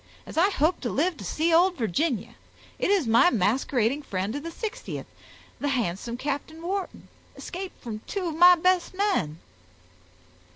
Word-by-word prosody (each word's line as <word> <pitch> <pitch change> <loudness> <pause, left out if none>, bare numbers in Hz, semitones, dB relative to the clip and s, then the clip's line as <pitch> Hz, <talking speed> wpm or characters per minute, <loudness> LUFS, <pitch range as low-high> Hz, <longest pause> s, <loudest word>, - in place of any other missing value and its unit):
As - - -10
I 350 +5 +4
hope 335 -2 +1
to 240 - -2
live 335 +8 +1
to - - -9
see 320 - 0
old 360 +2 +5
Virginia, 240 - -1 0.5
it - - +1
is 395 -7 +3
my 235 +10 +5
masquerading 240 - +1
friend 195 -5 -3
of 290 - -3
the 335 - -6
60th, 440 +7 -6 0.5
the 290 - -2
handsome 235 -3 -2
Captain 290 +4 -4
Wharton, 375 +3 -4 0.3
escaped 375 +1 -7
from 220 -3 -5
two 390 -2 -3
of 320 - -3
my 355 +2 +8
best 365 +1 +1
men!" 375 - 0
310 Hz, 160 wpm, -26 LUFS, 235-360 Hz, 0.5 s, my